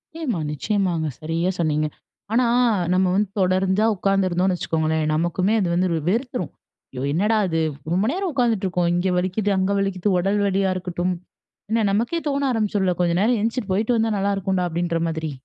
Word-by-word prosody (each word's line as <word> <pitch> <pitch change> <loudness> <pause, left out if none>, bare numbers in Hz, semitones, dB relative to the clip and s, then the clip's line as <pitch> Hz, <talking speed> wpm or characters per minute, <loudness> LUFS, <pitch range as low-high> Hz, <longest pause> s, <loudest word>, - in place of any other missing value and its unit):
நிச்சயமா, 270 - -2
நிச்சயமாங்க 170 - -1
சரியா 165 +3 -1
சொன்னீங்க. 155 -2 +1 0.5
ஆனா, 245 +2 +3 0.5
நம்ம 185 +1 +3
வந்து 205 0 +1
தொடர்ந்து 190 +3 +2
உட்கார்ந்திருந்தோம்ன்னு 185 -1 +1
வைச்சுக்கோங்களேன், 160 -1 0
நமக்குமே 175 +5 +1
அது 185 - 0
வந்து 180 +1 +1
வெறு 160 -2 -2
வெறுத்துரும். 240 - -2 0.4
"ஐயோ! 125 - -5
என்னடா 210 +7 +2
அது. 165 -1 0 0.3
ரொம்ப 190 +4 +2
நேரம் 380 0 -2
உட்கார்ந்துட்டு 230 -7 +1
இருக்கோம். 180 -1 0
இங்க 180 +2 +1
வலிக்கிது, 190 +3 0
அங்க 190 +1 +1
வலிக்கிது." 195 0 -1
உடல் 195 +3 +1
வலியா 195 -1 +1
இருக்கட்டும். 180 0 -2 0.6
என்ன 225 -1 +2
நமக்கே 235 +12 0
தோன 280 -1 0
ஆரம்பிச்சிரும்ல. 205 -5 0
"கொஞ்சம் 170 0 +2
நேரம் 230 +2 +2
எந்திச்சு 230 +3 -1
போய்ட்டு 220 +5 +1
வந்தா 225 0 +1
நல்லா 200 +1 +1
இருக்கும்டா" 190 -1 0
அப்டின்ற 170 0 -1
மாதிரி. 160 -1 -3
190 Hz, 165 wpm, -22 LUFS, 175-215 Hz, 0.6 s, ஆனா